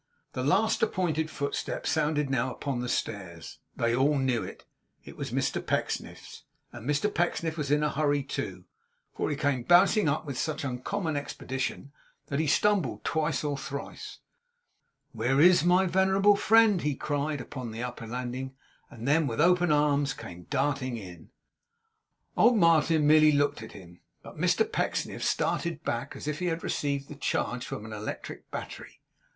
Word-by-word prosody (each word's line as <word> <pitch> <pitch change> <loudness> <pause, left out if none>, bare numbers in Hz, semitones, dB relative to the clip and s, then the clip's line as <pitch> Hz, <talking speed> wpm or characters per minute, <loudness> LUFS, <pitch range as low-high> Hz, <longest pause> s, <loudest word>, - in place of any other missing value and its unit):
The 130 - -3
last 205 +10 +2
appointed 160 -7 0
footstep 140 -2 -3
sounded 150 -2 +1
now 130 -1 0
upon 135 -1 -3
the 125 0 -3
stairs. 90 -9 -4 0.2
They 115 0 +1
all 140 +3 +3
knew 130 -3 +1
it. - - -10 0.4
It - - -11
was - - -5
Mr - - -1
Pecksniff's; - - -3 0.3
and 120 +3 -7
Mr 150 +9 +1
Pecksniff 165 -2 0
was 150 -4 -3
in 150 +1 +2
a 150 - +1
hurry 145 -1 +1
too, 135 - -5 0.5
for - - -1
he 145 - -1
came 140 -3 0
bounding 175 - +5
up 145 +3 -1
with 140 -4 -5
such 155 -2 -2
uncommon 155 +6 -3
expedition 135 -1 -4 0.4
that 140 - -1
he 160 - +1
stumbled 205 +5 +1
twice 160 0 0
or 145 -1 -1
thrice. 140 0 -7 0.9
'Where 120 +4 0
is 175 +1 +6
my 180 +2 +4
venerable 190 +3 +4
friend?' 215 -2 +4
he 145 -1 -1
cried 145 +1 -2
upon 125 -2 -6
the 115 +2 -5
upper 120 -2 -6
landing; 125 +2 -5 0.3
and 120 -1 -8
then 150 +1 +3
with 115 0 -3
open 175 +1 +4
arms 145 -2 +2
came 90 0 -10
darting 135 -4 -1
in. 90 -6 -11 1.1
Old 240 -1 +5
Martin 160 -3 +4
merely 155 0 +6
looked 145 -3 +1
at 115 - -10
him; 90 -3 -13 0.2
but - - -11
Mr - - +2
Pecksniff - - -2
started - - -1
back - - -3
as - - -8
if 150 +1 -2
he 180 - -1
had 165 -1 -2
received 140 -1 -2
the - - -8
charge 125 -3 -2
from 105 - -6
an 110 - -8
electric 105 0 -7
battery. - - -8
145 Hz, 165 wpm, -28 LUFS, 130-160 Hz, 1.1 s, is